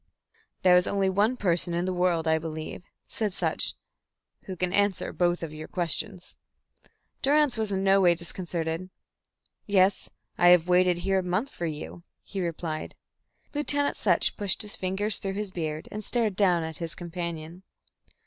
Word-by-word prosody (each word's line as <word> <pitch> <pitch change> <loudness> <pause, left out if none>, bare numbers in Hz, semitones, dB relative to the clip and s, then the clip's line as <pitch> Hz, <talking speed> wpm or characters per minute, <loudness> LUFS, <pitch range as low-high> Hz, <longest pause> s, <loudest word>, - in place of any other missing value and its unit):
"There 180 -1 +7
is 180 +1 +4
only 195 -1 +1
one 210 +6 +2
person 175 -3 +1
in 175 +1 0
the 185 - -1
world, 175 -2 +1
I 160 0 +3
believe," 160 +2 -6 0.2
said 210 -4 -2
Sutch, - - +1 0.7
"who 190 - -5
can 180 0 -1
answer 205 -2 +1
both 175 -1 +1
your 155 -1 -6
questions." 180 +2 -3 0.8
Durrance 290 -2 +3
was 220 -2 -1
in 190 0 0
no 195 0 +5
way 175 -2 +5
disconcerted. 170 0 -4 0.8
"Yes. 195 -1 +3 0.3
I 175 - +6
have 175 -1 +6
waited 180 0 +4
here 195 +2 +1
a - - -2
month 185 +10 -1
for 170 - -4
you," 155 +2 -6 0.2
he 195 -1 -5
replied. 165 -2 -4 0.6
Lieutenant 290 -1 +1
Sutch 180 -5 +2
pushed 200 0 +1
his 210 - -6
fingers 195 +3 0
through 195 -1 -3
his 205 -1 -3
beard, 155 -3 -4
and 215 +1 -5
stared 220 -3 0
down 180 -4 +3
at 160 -2 -6
his 165 -1 -4
companion. 170 -1 -6
180 Hz, 160 wpm, -27 LUFS, 170-200 Hz, 0.8 s, There